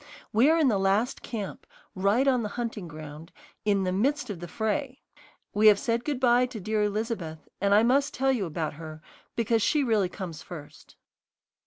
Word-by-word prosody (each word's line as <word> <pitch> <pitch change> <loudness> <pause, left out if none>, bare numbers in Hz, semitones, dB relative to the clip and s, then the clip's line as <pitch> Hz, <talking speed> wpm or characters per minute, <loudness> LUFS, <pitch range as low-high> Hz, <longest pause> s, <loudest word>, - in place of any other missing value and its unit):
We 235 +7 +5
are 325 - +4
in 315 -4 +4
the 210 -6 +2
last 200 +6 +1
camp, 210 -5 -6 0.3
right 205 +7 +2
on 255 -3 +3
the 210 - -3
hunting 225 -6 -3
ground, 155 +1 -10 0.3
in 200 -2 +2
the 185 - 0
"midst 270 +7 0
of 185 - -6
the 175 - -7
fray." 255 - -2 0.5
We 215 +1 +5
have 210 -1 +8
said 230 +2 -1
good 285 -2 -2
bye 250 -1 +4
to 245 -3 -7
dear 215 +2 -1
Elizabeth, 210 -7 -3
and 200 0 +2
I 215 - +6
must 275 +4 +3
tell 270 +1 +1
you 220 -8 -1
about 155 -1 -3
her 155 0 -9 0.3
because 230 0 +1
she 295 +6 +2
really 215 -7 +2
comes 175 -6 -7
first. 150 -4 -11
215 Hz, 190 wpm, -27 LUFS, 185-245 Hz, 0.5 s, have